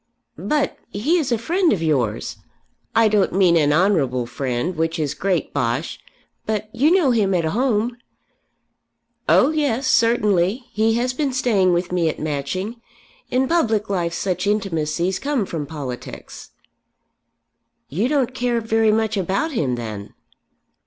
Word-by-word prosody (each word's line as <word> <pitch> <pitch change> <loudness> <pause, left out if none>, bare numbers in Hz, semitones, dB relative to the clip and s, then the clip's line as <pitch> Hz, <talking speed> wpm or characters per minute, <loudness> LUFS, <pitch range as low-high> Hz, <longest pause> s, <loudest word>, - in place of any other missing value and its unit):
"But 295 -1 -1
he 295 - +1
is 280 -5 -2
a 235 - +2
friend 340 - +1
of 170 -5 0
yours? 130 -9 -1 0.6
I 225 0 +5
don't 205 -4 +2
mean 185 -2 +4
an 150 -3 +3
'honourable 150 -8 +2
friend,' 130 +7 -3
which 165 +1 -1
is 150 -4 -1
great 185 -5 -1
bosh; 120 +6 -2 0.5
but 215 0 -3
you 275 +6 +3
know 345 -7 +4
him 205 -5 +2
at 170 -2 +1
home." 230 +4 0 1.3
"Oh 275 - +5
yes; 285 -5 0
certainly. 230 -2 +2
He 220 +1 +1
has 250 +2 0
been 280 +1 -1
staying 220 -8 +2
with 175 +1 -1
me 175 -3 +1
at - - -4
Matching. 170 - -3 0.5
In 260 +1 +1
public 225 -10 +1
life 170 -3 -1
such 185 0 -2
intimacies 185 -3 -1
come 275 -6 -1
from 155 -5 -5
politics." 135 -5 -8 1.4
"You 195 - -1
don't 265 -3 0
care 245 -2 0
very 225 -1 +2
much 220 -1 0
about 195 - -1
him 140 - 0
then." 110 -4 -7
205 Hz, 145 wpm, -21 LUFS, 165-240 Hz, 1.4 s, I